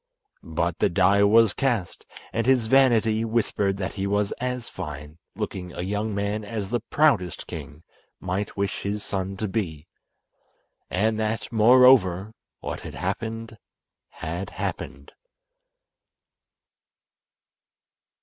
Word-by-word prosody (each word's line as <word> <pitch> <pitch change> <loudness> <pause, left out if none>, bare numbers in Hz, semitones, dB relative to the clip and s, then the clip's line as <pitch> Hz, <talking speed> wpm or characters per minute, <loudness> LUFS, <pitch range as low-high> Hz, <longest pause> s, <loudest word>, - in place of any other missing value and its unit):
But 85 0 -2
the - - +3
die 95 +4 +4
was 110 +1 +5
cast, 120 -10 -2 0.3
and 115 +1 0
his 130 -3 +4
vanity 115 -3 +4
whispered 105 -3 0
that 95 -2 -3
he 100 -1 -2
was 100 0 0
as 125 -1 -2
fine 75 -2 -8 0.2
looking 90 -2 -5
a 90 - -4
young 105 +2 -2
man 100 +1 -2
as 105 -1 -5
the 120 - +1
proudest 115 - +1
king 75 +1 -9 0.4
might 95 +3 -3
wish 100 -1 -1
his 105 +1 -3
son 95 0 -3
to 110 - -2
be, 85 -7 -3 1.0
and 110 +3 +1
that, 110 +1 -2
moreover, 110 -4 +5 0.3
what - - -4
had - - -9
happened 115 -1 -4 0.5
had 85 +5 -5
happened. - - -5
105 Hz, 120 wpm, -25 LUFS, 95-115 Hz, 1.0 s, was